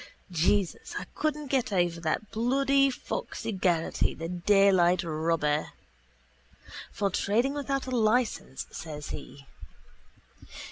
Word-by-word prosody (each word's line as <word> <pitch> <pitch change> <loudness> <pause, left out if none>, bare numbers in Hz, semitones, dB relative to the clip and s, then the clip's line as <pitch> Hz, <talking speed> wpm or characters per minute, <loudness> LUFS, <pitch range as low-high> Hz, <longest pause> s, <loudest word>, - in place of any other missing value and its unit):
Jesus, 180 +3 0
I - - -4
couldn't 300 -2 -2
get 260 -5 +1
over 175 -3 +1
that 165 +6 -2
bloody 275 +4 +3
foxy 250 -3 -4
Geraghty, 180 -4 0
the 165 +1 -5
daylight 185 -1 +4
robber. 155 -2 0 1.2
For 200 -2 -1
trading 235 +9 +1
without 275 -1 -2
a 260 - -5
licence, 225 - +1
says 150 -2 -7
he. 140 -1 -8
195 Hz, 105 wpm, -28 LUFS, 165-250 Hz, 1.2 s, daylight